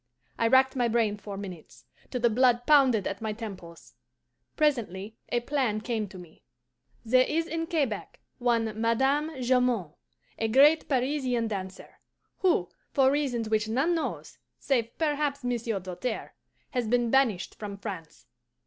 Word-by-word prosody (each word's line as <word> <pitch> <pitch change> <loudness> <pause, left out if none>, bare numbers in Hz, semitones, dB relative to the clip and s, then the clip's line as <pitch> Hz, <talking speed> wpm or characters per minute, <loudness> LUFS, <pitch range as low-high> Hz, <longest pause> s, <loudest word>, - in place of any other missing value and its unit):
I 230 - +3
racked 265 +2 +4
my 245 -2 +2
brain 225 -2 +1
for 200 -1 -8
minutes, 185 -5 -9 0.2
till 250 - -3
the 240 - +4
blood 245 +1 +3
pounded 265 -9 +5
at 195 - -4
my 220 -1 -2
temples. 195 -7 -9 0.6
Presently 220 - 0
a 240 - 0
plan 245 -5 0
came 220 -1 -2
to 190 - -12
me. 175 -3 -14 0.6
"There 255 +3 +5
is 330 +1 0
in 330 +1 -3
Quebec 285 - -2 0.2
one 225 -3 0
Madame 265 +7 +2
Jamond, 245 -9 +1 0.5
a 225 - +1
great 285 +7 +5
Parisian 255 -3 0
dancer, 190 -2 -7 0.4
who, 335 - +2 0.2
for 265 -1 +4
reasons 265 -6 -1
which 215 0 0
none 270 +10 +1
knows 330 - -4 0.2
save 235 -4 -1
perhaps 295 -3 -1
Monsieur 235 -4 -1
Doltaire, 185 +7 -5 0.4
has 245 -3 -1
been 240 0 +1
banished 245 -9 +2
from 205 -2 -7
France. 190 -6 -8
235 Hz, 145 wpm, -28 LUFS, 215-270 Hz, 0.6 s, pounded